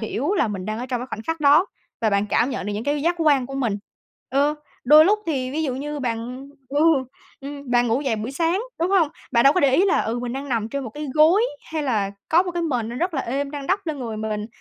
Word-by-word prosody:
hiểu 265 Hz, -, -1 dB
là 235 Hz, -, +2 dB
mình 195 Hz, -3 st, -5 dB
đang 215 Hz, +2 st, -3 dB
ở 250 Hz, -, -4 dB
trong 250 Hz, -2 st, -2 dB
cái 250 Hz, -, -5 dB
khoảnh 220 Hz, -, -6 dB
khắc 325 Hz, +5 st, -3 dB
đó 300 Hz, +6 st, +5 dB, 0.3 s
và 220 Hz, -2 st, +2 dB
bạn 200 Hz, +1 st, +1 dB
cảm 235 Hz, +5 st, +1 dB
nhận 205 Hz, -, -4 dB
được 210 Hz, -, -2 dB
những 210 Hz, +3 st, -4 dB
cái 290 Hz, 0 st, 0 dB
giác 345 Hz, +2 st, +2 dB
quan 285 Hz, -6 st, +3 dB
của 270 Hz, -, -8 dB
mình. 235 Hz, -7 st, -1 dB, 0.5 s
Ừ, 285 Hz, +3 st, +2 dB, 0.3 s
đôi 305 Hz, +4 st, +8 dB
lúc 415 Hz, +4 st, +3 dB
thì 265 Hz, -5 st, -1 dB
ví 310 Hz, +4 st, -2 dB
dụ 265 Hz, -5 st, -1 dB
như 295 Hz, +2 st, -4 dB
bạn 250 Hz, +2 st, -4 dB, 0.2 s
ừ, 285 Hz, +2 st, -1 dB, 0.6 s
ừm, 280 Hz, -1 st, -8 dB
bạn 245 Hz, 0 st, +3 dB
ngủ 235 Hz, +3 st, +1 dB
dậy 260 Hz, -6 st, -1 dB
buổi 215 Hz, +4 st, -4 dB
sáng, 335 Hz, +6 st, +1 dB, 0.2 s
đúng 345 Hz, +3 st, +1 dB
hông? 365 Hz, -6 st, +4 dB, 0.2 s
Bạn 235 Hz, -1 st, +4 dB
đâu 275 Hz, -, +7 dB
có 365 Hz, -, +1 dB
để 270 Hz, -2 st, +4 dB
ý 365 Hz, +7 st, +4 dB
là, 390 Hz, -, +3 dB
ừ, 230 Hz, +2 st, -2 dB
mình 240 Hz, 0 st, -4 dB
đang 275 Hz, +2 st, -5 dB
nằm 225 Hz, -4 st, -1 dB
trên 275 Hz, +3 st, -4 dB
một 225 Hz, -, -6 dB
cái 295 Hz, +6 st, -6 dB
gối 320 Hz, +8 st, +5 dB, 0.3 s
hay 315 Hz, -1 st, -1 dB
là 215 Hz, -8 st, 0 dB, 0.2 s
có 335 Hz, +3 st, +5 dB
một 365 Hz, -, -4 dB
cái 345 Hz, 0 st, -2 dB
mền 245 Hz, -9 st, -1 dB
nó 240 Hz, -, -6 dB
rất 350 Hz, +4 st, -1 dB
là 270 Hz, -, 0 dB
êm 275 Hz, +4 st, -2 dB
đang 285 Hz, -2 st, -6 dB
đắp 390 Hz, 0 st, 0 dB
lên 310 Hz, -3 st, -3 dB
người 230 Hz, -4 st, -5 dB
mình, 215 Hz, -1 st, -3 dB
275 Hz, 275 wpm, -23 LUFS, 235-305 Hz, 0.6 s, đôi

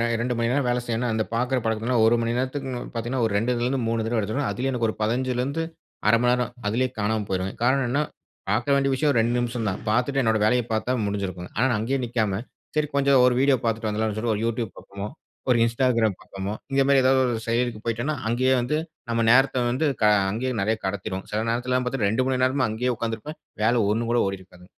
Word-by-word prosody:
2 120 Hz, +2 st, -1 dB
மணி 115 Hz, 0 st, +1 dB
நேரம் 135 Hz, -2 st, +1 dB
வேலை 120 Hz, 0 st, +1 dB
செய்யணும்னா. 120 Hz, 0 st, -1 dB
அந்த 110 Hz, 0 st, +1 dB
பார்க்குற 125 Hz, +2 st, +1 dB
பழக்கத்தினால 110 Hz, +2 st, +1 dB
1 120 Hz, -, +4 dB
மணி 115 Hz, +1 st, -1 dB
நேரத்துக்கு 130 Hz, +1 st, -2 dB, 0.2 s
பார்த்தீங்கன்னா 120 Hz, +2 st, -2 dB
ஒரு 100 Hz, -, -4 dB
2 115 Hz, +4 st, +1 dB
ல -, -, -1 dB
இருந்து 130 Hz, +1 st, 0 dB
3 115 Hz, -1 st, 0 dB
தடவ 115 Hz, 0 st, 0 dB
எடுத்துடுவேன். 110 Hz, +7 st, -1 dB
அதிலேயும் 135 Hz, +2 st, -2 dB
எனக்கு 115 Hz, -2 st, 0 dB
ஒரு -, -, -4 dB
15 125 Hz, +4 st, 0 dB
லேந்து 140 Hz, +6 st, -1 dB, 0.5 s
1/2 115 Hz, -, +6 dB
மணி 125 Hz, 0 st, +3 dB
நேரம், 125 Hz, -1 st, -1 dB, 0.2 s
அதிலேயே 125 Hz, +4 st, +1 dB
காணாம 105 Hz, 0 st, 0 dB
போயிருவேன். 95 Hz, 0 st, -2 dB
காரணம் 130 Hz, +2 st, +3 dB
என்னனா 145 Hz, +4 st, +1 dB, 0.5 s
பார்க்க 120 Hz, +6 st, +1 dB
வேண்டிய 135 Hz, 0 st, +2 dB
விஷயம் 145 Hz, +2 st, +2 dB
ஒரு 115 Hz, -, +3 dB
2 120 Hz, +2 st, +1 dB
நிமிஷம் 120 Hz, -2 st, -2 dB
தான். 95 Hz, -, -3 dB
பார்த்துட்டு 125 Hz, +4 st, +1 dB
என்னுடைய 110 Hz, -2 st, +2 dB
வேலைய 125 Hz, +2 st, +3 dB
பார்த்தா 110 Hz, +3 st, 0 dB
முடிஞ்சிடும். 100 Hz, -3 st, -3 dB, 0.2 s
ஆனா, 125 Hz, -, +3 dB
நான் 120 Hz, -, +1 dB
அங்கேயே 130 Hz, +5 st, -1 dB
நிக்காம 110 Hz, -5 st, -1 dB, 0.4 s
சரி 150 Hz, -1 st, +1 dB
கொஞ்சம் 140 Hz, -2 st, +4 dB
ஒரு 125 Hz, -, +4 dB
வீடியோ 135 Hz, -1 st, +4 dB
பார்த்துட்டு 115 Hz, -1 st, -1 dB
வந்துடலாம்னு 110 Hz, 0 st, -1 dB
சொல்லி. 115 Hz, +1 st, 0 dB
ஒரு 105 Hz, -, -3 dB
YouTube 115 Hz, -2 st, -2 dB
பார்ப்போமோ, 100 Hz, +1 st, -7 dB, 0.4 s
ஒரு 120 Hz, -, +5 dB
Instagram 115 Hz, -3 st, +2 dB
பார்ப்போமோ. 95 Hz, +1 st, -5 dB, 0.2 s
இந்த 135 Hz, 0 st, +3 dB
மாரி 140 Hz, -1 st, +5 dB
ஏதாது 130 Hz, +1 st, +4 dB
ஒரு 120 Hz, -2 st, 0 dB
செயலிக்கு 115 Hz, -1 st, 0 dB
போய்ட்டேனா 120 Hz, +6 st, -1 dB
அங்கேயே 130 Hz, +2 st, +2 dB
வந்து 150 Hz, +6 st, 0 dB, 0.3 s
நம்ம 115 Hz, 0 st, +1 dB
நேரத்த 130 Hz, -1 st, +4 dB
வந்து 150 Hz, +5 st, +1 dB, 0.2 s
க -, -, +6 dB, 0.3 s
அங்கேயே 130 Hz, +4 st, -2 dB
நிறைய 110 Hz, +2 st, +1 dB
கடத்திடுவோம். 95 Hz, -1 st, -3 dB
சில 105 Hz, -, 0 dB
நேரத்துல 125 Hz, +2 st, 0 dB
பார்த்தீன்னா 125 Hz, -5 st, 0 dB
2 130 Hz, +4 st, +1 dB
மணி 130 Hz, -1 st, 0 dB
நேரமா 130 Hz, -2 st, +1 dB
அங்கேயே 125 Hz, +3 st, -1 dB
உட்கார்ந்திருப்பேன். 115 Hz, +7 st, -4 dB, 0.2 s
வேல 115 Hz, 0 st, +3 dB
ஒன்னு 115 Hz, +2 st, -1 dB
கூட 120 Hz, -, +3 dB
ஓடியிருக்காது. 90 Hz, -2 st, -8 dB
120 Hz, 215 wpm, -24 LUFS, 110-130 Hz, 0.5 s, 1/2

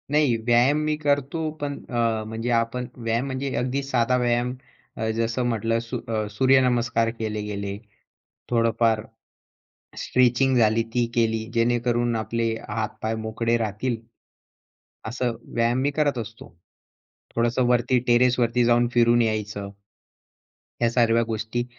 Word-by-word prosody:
नाही 145 Hz, -4 st, +3 dB
व्यायाम 120 Hz, +4 st, +4 dB
मी 155 Hz, 0 st, +1 dB
करतो, 145 Hz, +2 st, 0 dB
पण 145 Hz, -1 st, -2 dB, 0.2 s
अ, 115 Hz, -2 st, 0 dB
म्हणजे 115 Hz, +2 st, -4 dB
आपण 120 Hz, +2 st, -3 dB
व्यायाम 115 Hz, +1 st, -1 dB
म्हणजे 135 Hz, 0 st, -3 dB
अगदी 130 Hz, +3 st, -1 dB
साधा 125 Hz, -2 st, +1 dB
व्यायाम 120 Hz, 0 st, +1 dB, 0.4 s
अ, 110 Hz, 0 st, -1 dB
जसं 115 Hz, +2 st, 0 dB
म्हटलं 115 Hz, 0 st, 0 dB
सू 115 Hz, +2 st, -5 dB
अ, 110 Hz, -2 st, -1 dB
सूर्यनमस्कार 120 Hz, -1 st, +3 dB
केले 110 Hz, -1 st, -2 dB
गेले. 100 Hz, -1 st, -4 dB, 0.7 s
थोडंफार 115 Hz, -2 st, +2 dB, 1.0 s
स्ट्रेचिंग 130 Hz, +1 st, +2 dB
झाली 115 Hz, -1 st, +3 dB
ती 120 Hz, -1 st, +2 dB
केली 115 Hz, -1 st, +1 dB
जेणेकरून 120 Hz, 0 st, +1 dB
आपले 115 Hz, +1 st, -1 dB, 0.2 s
हातपाय 110 Hz, +1 st, -3 dB
मोकळे 115 Hz, +1 st, 0 dB
राहतील. 115 Hz, +3 st, -2 dB, 1.1 s
असं 120 Hz, 0 st, -2 dB, 0.2 s
व्यायाम 120 Hz, +1 st, +2 dB
मी 145 Hz, -, +2 dB
करत 145 Hz, -3 st, 0 dB
असतो. 115 Hz, 0 st, -8 dB, 0.9 s
थोडंसं 120 Hz, +2 st, +1 dB
वरती 125 Hz, +1 st, +3 dB
टेरेसवरती 120 Hz, 0 st, +3 dB
जाऊन 120 Hz, 0 st, +3 dB
फिरून 120 Hz, 0 st, +4 dB
यायचं. 105 Hz, -2 st, -2 dB, 1.1 s
ह्या 120 Hz, -1 st, +3 dB
सर्व 115 Hz, -1 st, +3 dB
गोष्टी 115 Hz, +1 st, -3 dB
120 Hz, 125 wpm, -24 LUFS, 115-125 Hz, 1.1 s, व्यायाम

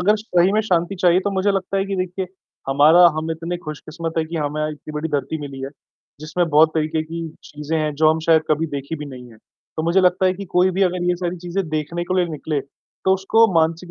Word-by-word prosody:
अगर 210 Hz, +4 st, +3 dB
सही 190 Hz, -3 st, +2 dB
में 215 Hz, -, +3 dB
शांति 180 Hz, -2 st, 0 dB
चाहिए 180 Hz, 0 st, +4 dB
तो 205 Hz, -, -2 dB
मुझे 195 Hz, +1 st, +1 dB
लगता 195 Hz, 0 st, -2 dB
है 195 Hz, -, +1 dB
कि 195 Hz, -1 st, -3 dB
देखिए 185 Hz, +1 st, -3 dB, 0.4 s
हमारा 150 Hz, +5 st, +6 dB, 0.2 s
हम 160 Hz, +1 st, -3 dB
इतने 165 Hz, +2 st, -3 dB
खुशकिस्मत 155 Hz, +2 st, -6 dB
हैं 160 Hz, -, 0 dB
कि 165 Hz, +1 st, -5 dB
हमें 150 Hz, 0 st, -2 dB
इतनी 150 Hz, 0 st, -10 dB
बड़ी 150 Hz, +2 st, -3 dB
धरती 145 Hz, +1 st, -2 dB
मिली 140 Hz, -2 st, -7 dB
है, 135 Hz, -, -5 dB, 0.5 s
जिसमें 165 Hz, +3 st, -1 dB
बहुत 155 Hz, +2 st, +5 dB
तरीक़े 155 Hz, 0 st, 0 dB
की 165 Hz, +1 st, -6 dB, 0.2 s
चीज़ें 150 Hz, +2 st, -4 dB
हैं 155 Hz, -1 st, -1 dB
जो 155 Hz, +1 st, +4 dB
हम 160 Hz, -, 0 dB
शायद 160 Hz, -1 st, +5 dB
कभी 155 Hz, +2 st, +2 dB
देखी 140 Hz, +1 st, -5 dB
भी 150 Hz, -, -6 dB
नहीं 125 Hz, -3 st, -10 dB
है। -, -, -16 dB, 0.4 s
तो 160 Hz, -, -1 dB
मुझे 170 Hz, +4 st, +3 dB
लगता 185 Hz, 0 st, +3 dB
है 185 Hz, -, +3 dB
कि 200 Hz, +2 st, -7 dB
कोई 180 Hz, +1 st, +4 dB
भी 190 Hz, +2 st, 0 dB
अगर 180 Hz, -1 st, +1 dB
ये 175 Hz, -, +2 dB
सारी 175 Hz, 0 st, -3 dB
चीज़ें 175 Hz, +1 st, -3 dB
देखने 155 Hz, +3 st, -3 dB
के 185 Hz, +1 st, -2 dB
लिए 180 Hz, -, +3 dB
निकले 150 Hz, -1 st, -2 dB, 0.4 s
तो 190 Hz, -, +4 dB
उसको 210 Hz, +4 st, +3 dB
मानसिक 165 Hz, +2 st, +1 dB
165 Hz, 235 wpm, -21 LUFS, 155-185 Hz, 0.5 s, हमारा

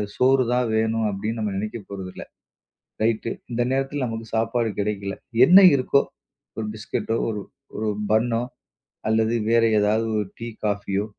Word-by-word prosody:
சோறுதான் 125 Hz, -1 st, +3 dB
வேணும் 110 Hz, 0 st, +1 dB
அப்டின்னு 105 Hz, +3 st, -3 dB
நம்ம 105 Hz, -2 st, -1 dB
நெனைக்கப்போறது 100 Hz, -2 st, -6 dB
இல்ல. -, -, -8 dB, 0.8 s
ரைட், 110 Hz, +1 st, +1 dB, 0.2 s
இந்த 120 Hz, 0 st, -1 dB
நேரத்துல 135 Hz, +1 st, -1 dB
நமக்குச் 115 Hz, -1 st, -6 dB
சாப்பாடு 115 Hz, +1 st, 0 dB
கெடைக்கல. 100 Hz, -1 st, -2 dB, 0.3 s
என்ன 180 Hz, +7 st, +8 dB, 0.2 s
இருக்கோ, 140 Hz, +1 st, +3 dB, 0.6 s
ஒரு 110 Hz, -, -2 dB
பிஸ்கட்டோ, 110 Hz, +1 st, -3 dB
ஒரு, 105 Hz, -2 st, -3 dB, 0.3 s
ஒரு 110 Hz, 0 st, -1 dB, 0.2 s
பன்னோ 115 Hz, +1 st, +2 dB, 0.7 s
அல்லது 110 Hz, +1 st, +2 dB, 0.2 s
வேற 115 Hz, 0 st, +4 dB, 0.2 s
ஏதாவது 105 Hz, +2 st, +2 dB
ஒரு 105 Hz, -, -3 dB
டீ, 115 Hz, -, -6 dB, 0.2 s
காஃபியோ, 100 Hz, -1 st, -1 dB
110 Hz, 135 wpm, -23 LUFS, 105-120 Hz, 0.8 s, என்ன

